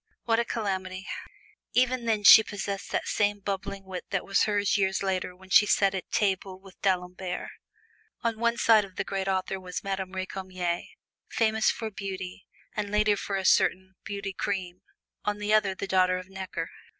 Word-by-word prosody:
"What 225 -1 +2
a 235 - +1
calamity!" 190 -4 -3 0.7
Even 255 -1 +2
then 220 -2 +1
she 220 - +11
possessed 200 -2 -5
that - - -1
same 205 -1 +1
bubbling 200 0 -4
wit 185 -1 -6
that 195 -2 -1
was 195 - +3
hers 205 -1 +1
years 190 -1 +1
later 185 -1 -1
when 190 +1 -17
she 205 +2 +7
sat 195 -1 +3
at 190 - -5
table 190 -2 0
with 190 -1 -17
D'Alembert. 180 -1 -2 0.7
On 230 -2 -1
one 235 0 +1
side 225 -3 +5
of 190 -2 -11
the - - -1
great 195 -1 -3
author 190 0 -1
was 180 -1 -6
Madame 190 -1 -3
Recamier, 185 -2 -3 0.5
famous 220 -1 +2
for 220 -2 -3
beauty 190 -1 -6 0.3
(and 210 -1 -2
later 210 0 +3
for 200 0 -3
a 190 -1 -2
certain 190 +1 +3
"Beauty 200 -1 -5
Cream"), 185 -2 -3 0.4
on 210 0 -1
the 210 +1 0
other 205 -3 +3
the 200 - -4
daughter 185 -1 +3
of 185 0 -8
Necker. 190 -3 -5
195 Hz, 175 wpm, -28 LUFS, 185-205 Hz, 0.7 s, she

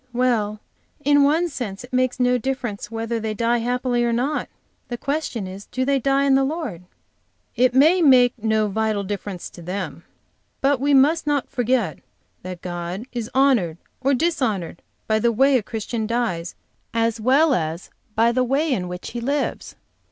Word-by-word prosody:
"Well, 230 -4 +1 0.5
in 285 0 +5
one 310 +5 +3
sense 240 - -5
it 245 - -13
makes 255 0 +1
no 250 0 +3
difference 240 -5 -3
whether 225 +1 -3
they 220 -1 -3
die 235 +2 +1
happily 245 +1 0
or 235 - +1
not. 255 +6 -1 0.4
The 240 - -4
question 275 -6 -2
is 190 +2 -9
do 255 +1 -2
they 275 0 +2
die 275 +2 +2
in 280 -1 +3
the 270 0 +4
Lord?" 275 - -3 0.7
"It 250 +1 +3
may 320 +7 +5
make 255 -5 +6
no 220 -1 +2
vital 215 0 -1
difference 200 -2 -5
to 175 - -12
them, 175 -2 -5 0.6
but 275 -1 +2
we 280 +1 +3
must 295 +4 +4
not 290 -3 0
forget 240 - 0 0.4
that 185 -1 -8
God 175 +4 -5
is 235 -2 -4
honored 245 - +3 0.2
or 275 +1 +2
dishonored 240 - -1 0.2
by 220 0 +1
the 235 +2 +2
way 270 +4 +4
a 250 - +3
Christian 220 +1 -4
dies, 210 -8 -2 0.4
as 230 -1 +1
well 275 +6 +4
as 165 -3 -3 0.2
by 230 +2 +4
the 255 +1 +1
way 275 +4 +1
in 180 -6 -2
which 180 0 -7
he 240 - -5
lives. 280 +4 -2
240 Hz, 175 wpm, -22 LUFS, 210-270 Hz, 0.7 s, make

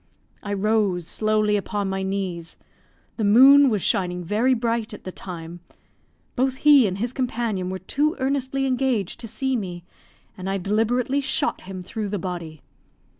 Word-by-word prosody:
I 205 - -4
rose 200 -3 +1
slowly 215 +2 +1
upon 205 0 -3
my 190 0 -2
knees; 190 -4 -4 0.6
the 225 - -1
moon 270 +7 +7
was 210 -5 -1
shining 180 -1 0
very 225 +8 +2
bright 230 -2 -2
at - - -14
the 185 - -6
time, 170 -2 -8 0.8
both 260 +1 +1
he 280 -4 +6
and 185 0 -3
his 235 +4 -2
companion 235 -8 -2
were 190 - -3
too 290 - -1
earnestly 270 0 -1
engaged 255 -7 -1
to 230 - -5
see 260 +4 -1
me, 180 -6 -5 0.5
and 185 0 -5
I 195 - 0
deliberately 225 +8 0
shot 290 +2 -1
him 185 -1 -7
through 210 +2 -4
the 205 - -2
body. 170 -5 -6
210 Hz, 160 wpm, -23 LUFS, 185-255 Hz, 0.8 s, moon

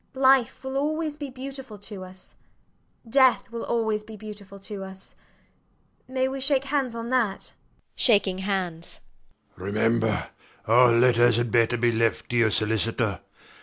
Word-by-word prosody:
Life 265 -2 +3
will 265 +1 -3
always 310 +1 -1
be 290 -2 -6
beautiful 265 -3 -8
to 200 -1 -8
us: 185 0 -12 0.7
death 260 0 +3
will 230 0 -5
always 220 -2 -1
be 220 0 -11
beautiful 205 -2 -10
to 195 0 -6
us. 190 0 -8 0.9
May 260 0 0
we 270 0 -5
shake 275 0 +2
hands 270 -4 -1
on 230 +1 -5
that? 230 -7 +1
SIR - - -10
PATRICK - - -9 0.3
[shaking - - -8
hands] 185 -4 -3 0.6
Remember: 110 +3 0 0.4
all 120 +3 +6
letters 120 0 +4
had 120 -1 0
better 120 +1 +3
be 120 0 +2
left 115 0 0
to - - -1
your 115 -2 +4
solicitor. 110 -1 0
200 Hz, 150 wpm, -25 LUFS, -, 0.9 s, all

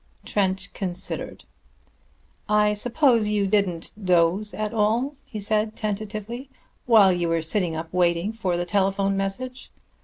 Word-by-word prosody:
Trent 190 -2 0
considered. 180 -3 -5 1.1
"I 210 0 +4
suppose 235 0 +2
you 210 -1 +1
didn't 195 -4 0
doze 180 +3 +2
at 215 +1 -3
all," 230 +6 +1
he 225 -6 -6
said 215 +1 0
tentatively, 215 +4 -4 0.4
"while 210 -6 +6
you 175 -1 -1
were 165 -1 +1
sitting 175 -1 0
up 160 +1 -6
waiting 175 +3 +1
for 185 -6 -1
the 175 - -1
telephone 195 +1 +1
message." 245 +7 -4
205 Hz, 130 wpm, -24 LUFS, 180-215 Hz, 1.1 s, while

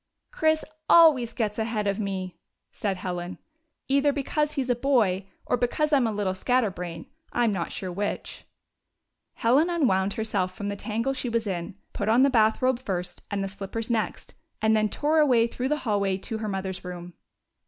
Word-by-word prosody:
" - - -55
Chris 315 0 +1 0.2
always 295 -9 +6
gets 215 -2 -2
ahead 220 -1 -1
of 200 +1 0
me! 190 -3 -3 0.2
" - - -56
said 195 -3 -2
Helen, 180 0 -4 0.3
" 320 - -53
either 280 +1 +3
because 295 +2 -1
he 275 - 0
's 255 - -8
a - - +2
boy 225 -8 +2 0.2
or - - +1
because 295 +6 0
I - - +7
'm 250 -4 +2
a - - -1
little 205 -3 -1
scatterbrain 185 -7 -1
— 320 - -31
I 240 - +2
'm 230 - +3
not 175 -4 -2
sure 185 -2 -4
which! 205 +3 -4 0.5
" - - -55
Helen 270 +9 +4
unwound 200 - +2
herself 200 -5 -1
from 205 -1 -4
the 200 - -3
tangle 230 +6 -2
she 260 -2 -3
was 230 -1 0
in, 180 -1 -4 0.2
put 205 - -2
on 240 +4 +5
the 275 - +4
bath 220 -1 +3
robe 255 -1 +3
first 180 -7 -4
and 200 -1 -1
the - - -2
slippers 205 +4 -5
next, 225 -2 -2 0.3
and 220 0 +3
then 215 -1 +2
tore 305 +6 +1
away 250 -6 +5
through 250 +2 -3
the 300 - +1
hallway 200 -3 +1
to 220 +3 -5
her 215 -1 -3
mother's 190 -1 -4
room. 180 -1 -7
220 Hz, 205 wpm, -26 LUFS, 195-255 Hz, 0.5 s, I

